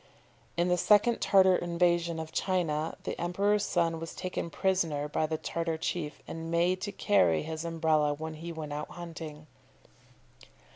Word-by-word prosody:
In 175 +1 +2
the 180 0 +2
second 210 +5 +4
Tartar 190 -1 +5
invasion 170 -1 +1
of 160 0 -6
China 165 -4 -1
the - - -4
emperor's 200 +4 +1
son 165 -2 +1
was 165 0 -7
taken 180 -2 -4
prisoner 165 -7 0
by 155 +1 0
the 155 0 -2
Tartar 165 0 -2
chief, 160 -2 -3
and 165 0 -6
made 175 +2 +2
to 205 - -3
carry 90 - +3
his 160 0 -5
Umbrella 160 -3 +2
when 160 +1 -5
he 165 +2 -7
went 155 -3 -6
out 150 +1 -4
hunting. 160 -3 -8
165 Hz, 155 wpm, -30 LUFS, 155-180 Hz, -, Tartar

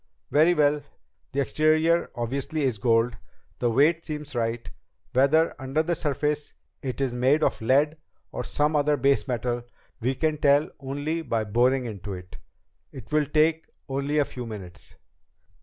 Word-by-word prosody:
"Very 160 +4 +5
well. 150 -1 +3 0.5
The 140 - 0
exterior 155 +4 +2
obviously 135 +6 -2
is 125 -6 0
gold. 115 +1 +2 0.4
The 120 - +1
weight 150 +8 +3
seems 150 -3 -6
right. 115 -1 -2 0.5
Whether, 140 +5 +4
under 135 +4 0
the 170 +2 0
surface, 150 -1 -1 0.3
it 130 -1 -4
is 135 -3 0
made 130 +5 +2
of - - 0
lead 145 +7 +2 0.3
or - - -4
some 150 +1 0
other 150 0 +2
base 135 -5 +2
metal 120 0 -1 0.4
we 125 +3 0
can 155 +2 0
tell 145 +1 +3
only 145 +4 -3
by 115 -7 -1
boring 125 +5 +2
into 105 -3 -6
it. 90 0 -11 0.5
It 130 -1 -11
will 150 -1 +2
take 155 +1 +2 0.2
only 140 +2 -1
a 145 - +4
few 125 -3 -7
minutes." 95 -5 -10
140 Hz, 155 wpm, -26 LUFS, 120-150 Hz, 0.5 s, Very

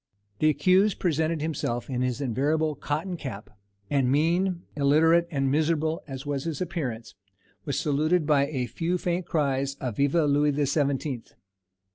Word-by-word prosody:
The 155 - +4
accused 185 +6 +3
presented 160 -2 0
himself 130 -6 -2
in 125 -2 -2
his 125 +1 -1
invariable 150 +5 0
cotton 155 +6 -3
cap; 115 -9 -7 0.4
and 130 +1 +1
mean, 175 +5 +1
illiterate, 160 +4 +4
and 135 -4 0
miserable 160 +1 +1
as 135 0 -7
was 145 -1 -3
his 160 -4 -3
appearance, 135 -11 -4 0.5
was 140 - -1
saluted 155 +3 +1
by 145 -2 +3
a 130 -5 -2
few 170 +7 -2
faint 175 0 -2
cries 140 -3 0
of 125 -6 -5
"_Vive 145 +3 +2
Louis 145 +1 +3
the 145 0 +1
Seventeenth! 140 -3 -1
150 Hz, 150 wpm, -26 LUFS, 135-165 Hz, 0.5 s, The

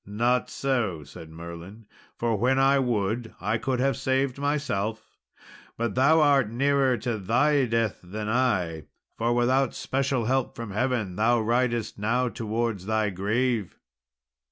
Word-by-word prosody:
"Not 120 +5 +1
so," 115 - -1
said 75 +3 -12
Merlin, 85 +6 -10 0.3
"for 115 -1 0
when 125 +6 +2
I 135 +1 +4
would, 115 -2 -1
I 105 +4 -1
could 130 0 -1
have 135 0 +2
saved 130 +1 0
myself; 110 -7 -1 0.7
but 115 -2 -1
thou 155 +5 +4
art 140 -6 +4
nearer 135 +1 +2
to 120 -3 -3
thy 130 +8 +2
death 115 -2 0
than 105 +4 -6
I, 95 - 0 0.3
for 115 +1 0
without 125 +2 +2
special 135 -3 -1
help 130 +1 0
from 115 -3 -6
heaven 110 -4 -1
thou 115 +2 +3
ridest 120 -1 0
now 120 +4 +1
towards 110 -4 -3
thy 110 -1 +1
grave." 105 +2 -1
115 Hz, 140 wpm, -26 LUFS, 105-130 Hz, 0.7 s, I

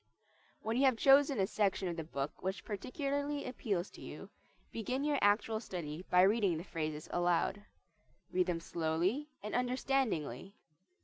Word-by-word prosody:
When 225 +2 -1
you 275 - +4
have 260 -3 +4
chosen 275 0 +5
a 190 - +4
section 195 -2 0
of 170 - -2
the 165 - -4
book 140 -2 -4
which 190 +1 -3
particularly 285 - -2
appeals 205 -7 -2
to - - -13
you, - - -9 0.4
begin 250 +5 -2
your 295 -2 +1
actual 210 +2 +3
study 175 -6 -5
by 180 0 +6
reading 200 -4 +3
the 165 - -5
phrases 155 -4 -4
aloud. 175 +3 +1 0.7
Read 185 0 +2
them 170 -2 -1
slowly 170 - -1
and 210 - -5
understandingly. 245 - 0
200 Hz, 150 wpm, -34 LUFS, 175-255 Hz, 0.7 s, by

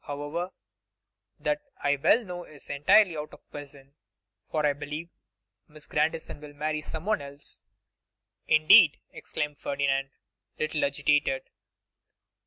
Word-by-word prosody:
However, 145 +5 -4 0.9
that 295 0 0 0.2
I 145 0 +3
well 225 - +4
know 175 -1 -6
is 150 -4 -10
entirely 165 +6 +5
out 150 0 -6
of - - -19
the - - -45
question, 140 -1 -11 0.6
for 155 -1 0
I 145 - +3
believe 150 +4 -6 0.6
Miss 150 0 -14
Grandison 155 0 -1
will 150 -1 -10
marry 155 +1 -2
someone 175 +7 -2
else.' 140 0 -3 0.9
'Indeed!' 155 +1 +7
exclaimed 150 -1 -4
Ferdinand, 135 -1 0 0.5
a - - -8
little 155 0 -1
agitated. 140 -1 +1
150 Hz, 125 wpm, -28 LUFS, 145-160 Hz, 0.9 s, Indeed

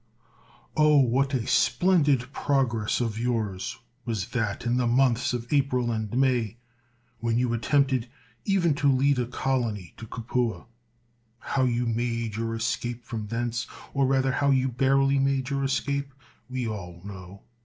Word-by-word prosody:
Oh, 150 -1 +5
what 135 +1 +3
a 120 -3 -1
splendid 140 -1 +2
progress 120 -6 0
of 115 -2 -2
yours 110 -6 -2 0.3
was 110 -6 -3
that 115 -3 -2
in 120 +1 +1
the 125 -1 +1
months 125 0 +2
of 120 +2 -4
April 130 -4 +2
and 110 -2 -3
May, 125 -4 +1 0.6
when 115 0 0
you 120 -1 +1
attempted 130 0 +1 0.3
even 185 -5 +2
to 140 -1 +5
lead 135 +1 +3
a 120 - 0
colony 120 -8 -2
to 115 - -9
Capua! 115 +1 -2 0.7
How 130 +2 0
you 120 0 0
made 115 -1 -1
your 115 0 -2
escape 115 +1 -3
from 110 -3 -5
thence, 120 +1 -2 0.3
or 140 -1 +2
rather 135 0 +2
how 140 +2 +1
you 135 -1 +3
barely 135 +2 +2
made 135 0 0
your 140 0 0
escape, 140 0 -1 0.3
we 130 -2 -2
all 90 -5 -6
know. 95 -1 -10
125 Hz, 150 wpm, -26 LUFS, 115-135 Hz, 0.7 s, Oh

